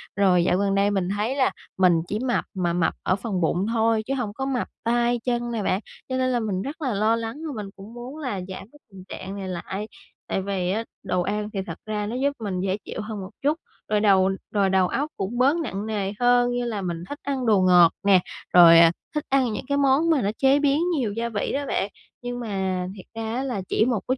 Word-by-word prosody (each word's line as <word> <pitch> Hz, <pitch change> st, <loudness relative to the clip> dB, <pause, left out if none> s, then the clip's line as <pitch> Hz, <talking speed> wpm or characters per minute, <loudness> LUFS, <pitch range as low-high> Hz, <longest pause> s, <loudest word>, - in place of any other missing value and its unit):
Rồi 185 Hz, -3 st, +4 dB
dạo 180 Hz, -, +2 dB
gần 200 Hz, 0 st, +1 dB
đây 200 Hz, +1 st, +3 dB
mình 190 Hz, -3 st, 0 dB
thấy 225 Hz, +6 st, -1 dB
là 265 Hz, -2 st, +2 dB, 0.3 s
mình 180 Hz, -3 st, +4 dB
chỉ 210 Hz, -, -2 dB
mập 250 Hz, 0 st, 0 dB
mà 175 Hz, -3 st, 0 dB
mập 170 Hz, -1 st, +1 dB
ở 185 Hz, -, +2 dB
phần 195 Hz, -2 st, -3 dB
bụng 175 Hz, +3 st, +1 dB
thôi 225 Hz, -1 st, +2 dB
chứ 270 Hz, -, 0 dB
hông 240 Hz, -6 st, -2 dB
có 265 Hz, +4 st, -3 dB
mập 265 Hz, -2 st, -1 dB, 0.2 s
tay 240 Hz, +1 st, +2 dB
chân 240 Hz, -1 st, -1 dB
nè 225 Hz, -3 st, -2 dB
bạn, 190 Hz, -, +1 dB, 0.3 s
cho 260 Hz, -, -1 dB
nên 255 Hz, 0 st, +1 dB
là 245 Hz, -, +1 dB
mình 205 Hz, -5 st, -2 dB
rất 285 Hz, +9 st, -6 dB
là 260 Hz, -6 st, 0 dB
lo 215 Hz, +3 st, +2 dB
lắng 230 Hz, +2 st, -4 dB
và 295 Hz, -, -4 dB
mình 200 Hz, -, -8 dB
cũng 200 Hz, +4 st, -12 dB
muốn 245 Hz, +4 st, -8 dB
là 260 Hz, -9 st, -3 dB
giảm 190 Hz, -, -6 dB
cái 295 Hz, -, -18 dB
tình 190 Hz, -1 st, -11 dB
trạng 190 Hz, +1 st, -6 dB
này 195 Hz, -1 st, -5 dB
lại. 190 Hz, +3 st, -4 dB, 0.4 s
Tại 195 Hz, -, -1 dB
vì 190 Hz, -2 st, -1 dB
á 220 Hz, +4 st, -1 dB, 0.2 s
đồ 180 Hz, -2 st, 0 dB
ăn 210 Hz, +3 st, -2 dB
thì 195 Hz, -, -2 dB
thật -, -, -6 dB
ra 210 Hz, -1 st, -2 dB
nó 220 Hz, +4 st, -4 dB
giúp 275 Hz, +3 st, +1 dB
mình 190 Hz, -3 st, -2 dB
dễ 190 Hz, +1 st, 0 dB
chịu -, -, -5 dB
hơn 215 Hz, 0 st, -5 dB
một 190 Hz, -, -7 dB
chút, 295 Hz, +3 st, +2 dB, 0.3 s
rồi 210 Hz, 0 st, +2 dB
đầu 195 Hz, -2 st, +4 dB, 0.2 s
rồi 200 Hz, -2 st, +2 dB
đầu 190 Hz, -1 st, +3 dB
óc 290 Hz, +10 st, -1 dB
cũng 200 Hz, +5 st, -3 dB
bớt 270 Hz, +6 st, +4 dB
nặng 215 Hz, -, -3 dB
nề 205 Hz, -3 st, -2 dB
hơn 245 Hz, 0 st, +4 dB
như 245 Hz, 0 st, -1 dB
là 220 Hz, -4 st, -3 dB
mình 170 Hz, -2 st, -4 dB
thích 290 Hz, -, -6 dB
ăn 270 Hz, -3 st, -2 dB
đồ 210 Hz, -4 st, +4 dB
ngọt 180 Hz, -2 st, +6 dB
nè, 200 Hz, -2 st, +6 dB, 0.3 s
rồi, 170 Hz, -2 st, +9 dB
à, 165 Hz, 0 st, +7 dB, 0.2 s
thích 300 Hz, -, 0 dB
ăn 265 Hz, -4 st, +2 dB
những 235 Hz, -, -5 dB
cái 280 Hz, 0 st, +1 dB
món 280 Hz, +4 st, +3 dB
mà 310 Hz, -5 st, +3 dB
nó 200 Hz, -, +1 dB
chế 270 Hz, +1 st, +4 dB
biến 285 Hz, +1 st, +2 dB
nhiều 235 Hz, -8 st, -1 dB
gia 230 Hz, +2 st, -2 dB
vị 210 Hz, -3 st, -2 dB
đó 285 Hz, +1 st, -1 dB
bạn. 200 Hz, -, -1 dB, 0.3 s
Nhưng 245 Hz, 0 st, -4 dB
mà 190 Hz, -5 st, -2 dB
thiệt 190 Hz, -, -11 dB
ra 225 Hz, 0 st, -3 dB
á 260 Hz, -, -1 dB
là 245 Hz, -7 st, -2 dB
chỉ 220 Hz, -, +3 dB
một 240 Hz, -4 st, +1 dB
ít 255 Hz, -, +1 dB
215 Hz, 255 wpm, -24 LUFS, 190-250 Hz, 0.4 s, rồi